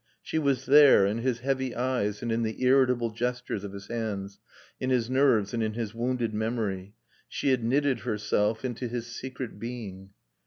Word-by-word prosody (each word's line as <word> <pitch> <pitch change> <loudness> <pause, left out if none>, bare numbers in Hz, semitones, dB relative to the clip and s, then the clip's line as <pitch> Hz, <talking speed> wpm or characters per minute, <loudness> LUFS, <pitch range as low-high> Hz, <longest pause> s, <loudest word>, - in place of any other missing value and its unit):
She 160 - -1
was 135 -3 0
there, 140 -7 +7
in 105 +3 0
his 120 0 -1
heavy 130 -1 -1
eyes 120 -5 -1
and 115 - -1
in 115 +1 +1
the 110 +2 -3
irritable 125 -3 +3
gestures 120 -2 -3
of 100 - -6
his 100 0 -8
hands, 100 -4 -4 0.4
in 130 - -2
his 125 -2 +1
nerves 130 -7 +3
and 115 - -1
in 110 -1 -1
his 115 -2 -3
wounded 120 -1 -1
memory. 105 -3 -2 0.3
She - - -1
had 130 -3 +2
knitted 135 +1 +2
herself 105 0 0
into 125 0 -3
his 120 0 -4
secret 125 -2 -7
being. 105 -5 -7
120 Hz, 180 wpm, -28 LUFS, 110-130 Hz, 0.4 s, there